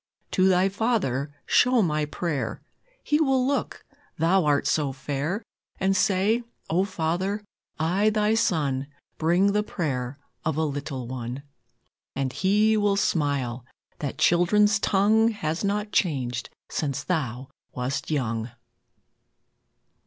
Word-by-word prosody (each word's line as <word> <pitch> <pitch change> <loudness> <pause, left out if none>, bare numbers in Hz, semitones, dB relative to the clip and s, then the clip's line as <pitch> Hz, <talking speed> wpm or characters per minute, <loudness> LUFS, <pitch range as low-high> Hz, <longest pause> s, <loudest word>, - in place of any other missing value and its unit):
To 185 0 +4
Thy 185 +1 +4
Father 195 - 0
show 250 -3 +4
my 155 -3 0
prayer 150 -2 -3 0.4
(He 300 0 +2
will 265 -4 +3
look, 280 +1 -2 0.3
Thou 170 +2 +3
art 145 -1 +2
so 145 -3 +1
fair), 145 - -3 0.4
And 195 0 +2
say: 205 +4 +2 0.3
"O 180 +4 +3
Father, 185 +3 -2 0.4
I, 185 +7 +2
Thy 215 0 +2
Son, 145 -11 +1 0.3
Bring 175 +5 +3
the 210 +1 +2
prayer 140 -10 -3 0.3
of 160 -2 -1
a 160 - +2
little 140 -4 -4
one." 125 +1 -5 0.7
And 135 -1 -2
He 210 +3 +3
will 205 -2 +2
smile, 140 -9 0 0.4
that 145 -3 -4
children's 205 +5 +4
tongue 210 +3 +3
Has 160 -4 -3
not 205 +1 -1
changed 130 - 0 0.2
since 145 -2 -2
Thou 135 -6 -2 0.2
wast 125 +3 -3
young! 115 -6 -1
165 Hz, 125 wpm, -25 LUFS, 140-205 Hz, 0.7 s, To